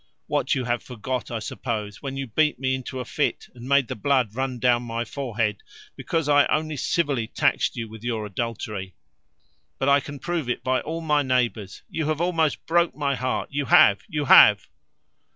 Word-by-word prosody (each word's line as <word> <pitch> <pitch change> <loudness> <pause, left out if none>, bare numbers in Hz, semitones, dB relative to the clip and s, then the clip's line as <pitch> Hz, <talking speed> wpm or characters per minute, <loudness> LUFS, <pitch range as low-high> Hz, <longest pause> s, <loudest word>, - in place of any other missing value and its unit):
What, - - 0
you 130 - -1
have 120 0 -1
forgot, 125 +1 -5
I 115 - -3
suppose, 110 -2 -5
when 135 -1 -5
you 135 - -3
beat 150 +6 +1
me 130 0 -1
into 130 0 -5
a 125 - -4
fit, - - -2
and 125 +1 -10
made 140 -3 +4
the - - -4
blood 125 -2 +1
run 130 +1 -2
down 120 0 +2
my 120 0 -4
forehead, 115 -5 -2 0.3
because 165 -3 -2
I 145 -1 +5
only 155 0 -1
civilly 140 -5 0
taxed - - 0
you 115 -1 -4
with 110 0 -12
adultery! 105 -3 -4 0.8
but 135 - -1
I 140 0 +5
can 145 +1 -8
prove 165 -3 -3
it 125 - -2
by 130 0 +1
all 165 +2 -5
my 150 -2 +2
neighbours. 120 -7 -1
You 160 -2 -3
have 155 -1 -1
almost 165 -3 0
broke 170 +1 +2
my 145 -2 0
heart, 130 -1 -2
you 145 0 -2
have, 100 -4 +6
you 150 -2 -2
have." 105 -6 +7
130 Hz, 190 wpm, -24 LUFS, 115-145 Hz, 0.8 s, have